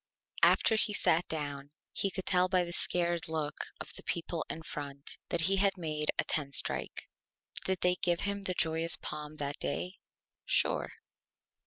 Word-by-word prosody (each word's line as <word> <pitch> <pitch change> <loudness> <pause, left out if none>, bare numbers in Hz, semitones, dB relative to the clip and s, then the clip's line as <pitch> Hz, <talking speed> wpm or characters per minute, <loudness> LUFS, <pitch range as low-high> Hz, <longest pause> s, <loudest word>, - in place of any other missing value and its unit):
After - - +5
he 210 -1 +2
sat 170 -3 +2
down 145 -3 -4 0.2
he 195 - 0
could 190 0 -5
tell 180 -1 +3
by 185 -1 +3
the 175 0 -5
Scared 175 -1 +1
Look 155 -2 -2
of - - -6
the - - -9
People 170 -1 -3
in 160 - -3
Front 140 -2 -6
that 170 - +5
he 195 +4 +3
had 195 0 +3
made 155 -3 -2
a - - +4
Ten 140 -3 -1
Strike. - - +1 0.6
Did 190 -1 0
they 180 0 +3
give 175 -2 +1
him 200 0 -1
the 185 -2 -2
Joyous 160 0 +3
Palm 150 0 -6
that 145 -1 -4
Day? 180 +6 -3 0.4
Sure! - - +1
170 Hz, 170 wpm, -31 LUFS, 150-185 Hz, 0.6 s, After